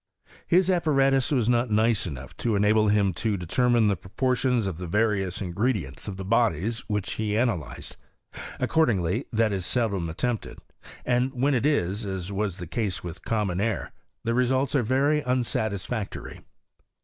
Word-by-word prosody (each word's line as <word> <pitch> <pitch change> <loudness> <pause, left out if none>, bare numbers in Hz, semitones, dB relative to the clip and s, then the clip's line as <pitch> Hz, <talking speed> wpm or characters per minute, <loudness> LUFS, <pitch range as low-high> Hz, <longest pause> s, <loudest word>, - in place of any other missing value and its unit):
His 185 +2 +4
apparatus 135 -6 +2
was 125 -6 +2
not 120 0 +2
nice 110 -1 +2
enough 65 -4 -8
to 115 -3 0
enable 105 +1 +3
him 100 -2 +3
to 110 -3 0
de 90 - -6
termine 120 +4 +3
the 100 - +2
proportions 125 +5 0
of 90 -4 -4
the 90 - -5
various 100 -1 0
ingredients 90 - -2
of 100 -2 -5
the 95 - -6
bodies 115 0 +1
which 105 -3 -2
he 105 -1 -1
analyzed: 110 - -2 0.6
accordingly 115 - +1
that 110 -2 +2
is 95 -2 -2
seldom 100 -6 0
attempted; 115 +7 -3 0.5
and 125 +1 +1
when 140 +3 +3
it 125 +2 +2
is, 105 - 0
as 95 -2 -4
was 100 -2 -2
the 90 - -6
case 95 +1 -3
with 85 0 -8
common 100 -5 -1
air, 110 0 -1 0.3
the 115 - 0
results 130 +2 +1
are 140 - +3
very 140 +6 +2
unsatisfactory. 110 -4 -2
110 Hz, 160 wpm, -26 LUFS, 95-125 Hz, 0.6 s, His